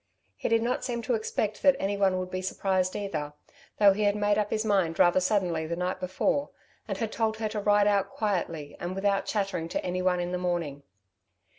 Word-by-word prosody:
He - - -3
did 230 0 +3
not 245 +2 -1
seem 235 -2 -3
to 250 - 0
expect 215 -1 -2
that 280 -1 +5
anyone 195 -1 +1
would 185 0 -4
be 185 - -2
surprised 185 0 0
either, 150 -8 -3 0.4
though 200 -2 +6
he 210 - -3
had 205 0 +3
made 205 0 +2
up 210 -1 0
his 215 0 -1
mind 190 -6 +1
rather 175 +1 +5
suddenly 180 -4 0
the 170 - -2
night 180 +1 -2
before, 185 +10 0 0.4
and - - -3
had 225 -2 -2
told 220 -1 0
her 220 -1 -2
to 215 0 -3
ride 205 0 +4
out 200 -1 +2
quietly 170 -9 -2
and 175 +2 -4
without 195 0 0
chattering 195 -6 -2
to - - -3
anyone 180 0 0
in 175 0 -2
the 180 - -2
morning. 170 -6 -2
195 Hz, 205 wpm, -28 LUFS, 180-210 Hz, 0.4 s, though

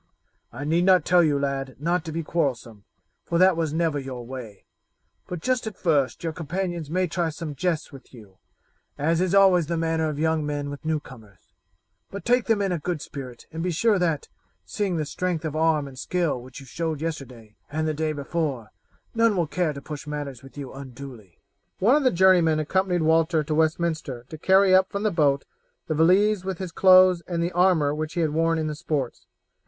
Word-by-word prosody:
I 135 +5 -7
need 165 +4 +1
not 185 -4 +5
tell 180 0 +5
you, 150 -4 +2
lad, 135 -1 -3
not 170 +3 0
to 160 - -5
be 165 +1 -3
quarrelsome, 125 -10 -2 0.4
for 170 - -1
that 185 0 +5
was 160 -2 -1
never 160 -2 0
your 130 -3 -7
way; 120 -5 -9 0.6
but 180 -2 -6
just 255 0 0
at 215 - -6
first 150 -6 0
your 165 -1 -2
companions 170 0 -4
may 185 +3 +1
try 170 -1 -1
some 155 0 -6
jests 165 +1 -2
with 135 -2 -14
you, 105 -6 -15 0.6
as 165 +4 +1
is 185 +1 +1
always 185 -5 +5
the 170 0 -1
manner 160 -1 0
of 150 - -5
young 160 0 +1
men 145 -1 -3
with 145 - -8
newcomers, 130 - -6 0.6
but 200 - -8
take 245 0 +3
them 220 -3 +2
in 195 - 0
a 175 - -1
good 170 +1 -3
spirit 130 -4 -9
and 160 +1 -5
be 180 - -1
sure 205 +4 +2
that, 165 -5 0 0.4
seeing 195 -5 -2
the 155 - -1
strength 170 +1 -3
of 155 -1 -3
arm 155 -2 +2
and 130 -2 -11
skill 170 -8 -1
which 125 +1 -11
you 135 - -12
showed 160 +2 -3
yesterday 130 -9 -6 0.2
and 155 +1 -1
the 155 - 0
day 155 +1 -1
before, 140 -6 -3 0.4
none 230 -3 +3
will 175 - +2
care 170 +1 -1
to 140 -1 -9
push 150 -1 -8
matters 145 -4 -5
with 135 +1 -15
you 140 -3 -7
unduly." 130 -7 -10 0.4
One 230 +8 +4
of 300 - +3
the 260 - +4
journeymen 175 -4 +4
accompanied 180 +2 0
Walter 160 0 +3
to 155 - -3
Westminster 155 -5 -1
to 160 - -8
carry 190 +2 +4
up 185 0 +5
from 200 +1 -3
the 215 - +2
boat 145 -4 +2 0.4
the 155 - -2
valise 185 +5 +3
with 190 -2 -4
his 185 -1 -5
clothes 185 -1 +6
and 170 -2 -1
the 170 - -1
armour 175 -5 +3
which 155 +2 -4
he 175 - +1
had 155 -2 +1
worn 165 +1 +1
in 160 - -1
the 155 - -2
sports. 145 -5 -4
160 Hz, 205 wpm, -25 LUFS, 145-180 Hz, 0.6 s, clothes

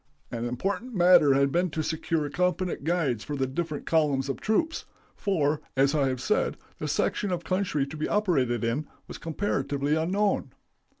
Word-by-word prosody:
"An 120 0 -3
important 200 - -3
matter 175 -6 +6
had 140 0 +3
been 180 +3 +1
to 155 0 -2
secure 160 -1 -1
competent 180 -1 0
guides 150 -9 0
for 150 - -4
the 135 -1 0
different 150 +3 -4
columns 145 -4 +1
of 135 - -3
troops, 315 +10 0 0.3
for, 155 -7 0 0.2
as 135 +2 +4
I 145 -3 +2
have 130 -1 -2
said, 210 +12 0 0.2
the - - -3
section 205 - 0
of 175 -1 -2
country 180 -6 0
to 155 +3 -8
be 155 - -1
operated 135 - +1
in 125 +7 -1 0.2
was - - -8
comparatively 150 -4 -1
unknown. 190 +6 0
155 Hz, 170 wpm, -27 LUFS, 140-180 Hz, 0.3 s, matter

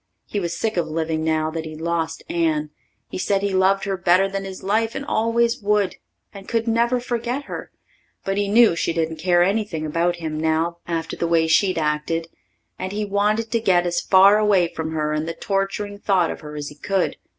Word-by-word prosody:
He 205 - -3
was 170 -2 -3
sick 220 -3 -2
of 170 -2 +1
living 160 0 -2
now 155 0 0
that 165 0 -4
he'd 155 -1 -8
lost 165 -1 -2
Anne. 155 -3 0 0.4
He - - -6
said 195 +1 0
he 200 -1 0
loved 190 +1 +3
her 195 -1 -1
better 185 +1 +3
than 195 0 -4
his 190 -1 -8
life 220 +3 0
and 280 - -4
always 235 0 +1
would, 205 -2 +1 0.4
and 195 -1 -11
could 230 -1 -1
never 235 +2 +2
forget 245 +3 -3
her, - - -7 0.6
but 195 - -1
he 205 0 0
knew 220 -2 +5
she 170 - -1
didn't 160 -1 -1
care 175 +1 +3
anything 195 -5 -1
about 170 +3 0
him 160 -3 -4
now 160 +2 0
after 165 -1 -3
the 170 - -1
way 165 -1 +3
she'd 185 +3 +3
acted, 155 +2 -1 0.5
and 185 - -4
he 210 +1 -2
wanted 210 +3 0
to 230 - +2
get 180 -5 +3
as 175 0 0
far 195 +2 +6
away 200 -5 +3
from 160 0 -4
her 150 -1 -1
and 155 +1 -2
the 165 - -4
torturing 200 +1 -2
thought 190 -5 +2
of - - -7
her 150 -1 -9
as 145 -1 -5
he 150 - -13
could. 195 +1 -1
185 Hz, 210 wpm, -22 LUFS, 160-205 Hz, 0.6 s, far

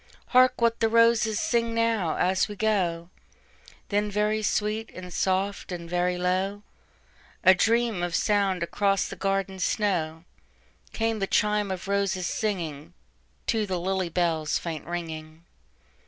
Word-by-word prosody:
"Hark 255 0 +5
what 230 -1 +2
the 225 - +2
roses 230 -1 +4
sing 230 -1 0
now, 225 -8 +1
as 185 +1 +2
we 210 - -7
go;"Then 200 +1 -3
very 210 +1 0
sweet 215 +1 -1
and 180 -1 -8
soft, 190 +2 -1
and 170 -1 -5
very 180 +1 0
low,—A 190 0 -1
dream 225 0 +1
of 175 -1 -1
sound 195 -3 +1
across 195 +2 +1
the - - -7
garden 195 -1 -1
snow,—Came 190 +4 -3
the 195 - -1
chime 210 0 +1
of 190 0 -5
roses 200 -2 0
singingTo 155 - -4
the 185 -2 -2
lily 190 0 -1
bell's 165 -3 0
faint 165 -3 -6
ringing. 160 -2 -6
195 Hz, 125 wpm, -26 LUFS, 175-210 Hz, -, Hark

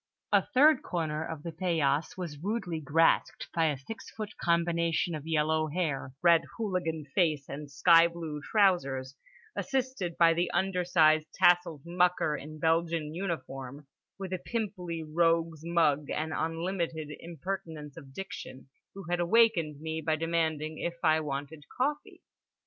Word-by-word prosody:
A - - +6
third 295 +3 +5
corner 155 -3 -2
of 160 -2 -6
the 170 - -4
paillasse 160 -4 0
was 165 -6 -6
rudely 190 -3 -2
grasped 155 +2 +2
by 165 -1 +2
a 145 -3 0
six 180 +13 -9
foot 215 -1 -7
combination 170 0 +1
of 155 0 -6
yellow 155 0 +1
hair, 150 -5 -2
red 170 -1 +6 0.2
hooligan 180 -8 -2
face, 155 -6 +1
and 145 0 -7
sky 165 +3 +6
blue 165 -3 -6
trousers; 140 -10 +1 0.4
assisted 260 -10 -2
by 165 -1 +6
the 175 +1 0
undersized 175 -5 +3
tasseled 175 -4 +3
mucker 175 -3 +2
in 155 +2 -8
Belgian 165 -1 0
uniform, 140 -6 -5 0.3
with 190 -1 -5
a 185 - -2
pimply 180 -8 -4
rogue's 165 0 +1
mug 155 -4 +2
and 160 +1 -2
unlimited 165 -2 -2
impertinence 165 -3 -6
of 140 -5 -12
diction, 135 -5 -8 0.3
who 195 - -8
had 175 0 0
awakened 175 -6 +3
me 160 0 -3
by 155 0 +1
demanding 160 -1 -1
if 170 0 -3
I 160 -1 +4
wanted 145 0 -5
coffee. 290 +3 -2
165 Hz, 140 wpm, -30 LUFS, 155-175 Hz, 0.4 s, A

